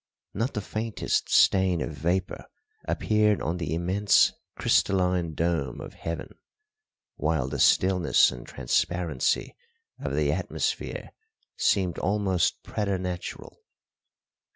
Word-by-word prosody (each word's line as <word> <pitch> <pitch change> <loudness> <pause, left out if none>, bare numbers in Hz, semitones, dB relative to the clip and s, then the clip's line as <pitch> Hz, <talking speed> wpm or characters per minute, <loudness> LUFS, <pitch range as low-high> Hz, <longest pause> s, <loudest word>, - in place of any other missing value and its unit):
Not 115 +6 -2
the 105 - -1
faintest 110 +2 -2
stain 95 -2 +4
of 80 - -3
vapour 85 +6 -2 0.4
appeared 105 -1 +2
on 85 +3 -2
the 80 -3 -2
immense 95 +4 +3 0.2
crystalline 90 -4 +1
dome 80 -7 -1
of - - -8
heaven, 80 -1 -6 0.8
while 75 -4 0
the - - -4
stillness 90 -2 +4
and 60 -1 -9
transparency 75 +3 -1 0.4
of - - -3
the - - +2
atmosphere - - -3 0.4
seemed 95 -4 +1
almost 95 -2 0
preternatural. 95 -3 -4
90 Hz, 105 wpm, -26 LUFS, 80-100 Hz, 0.8 s, stain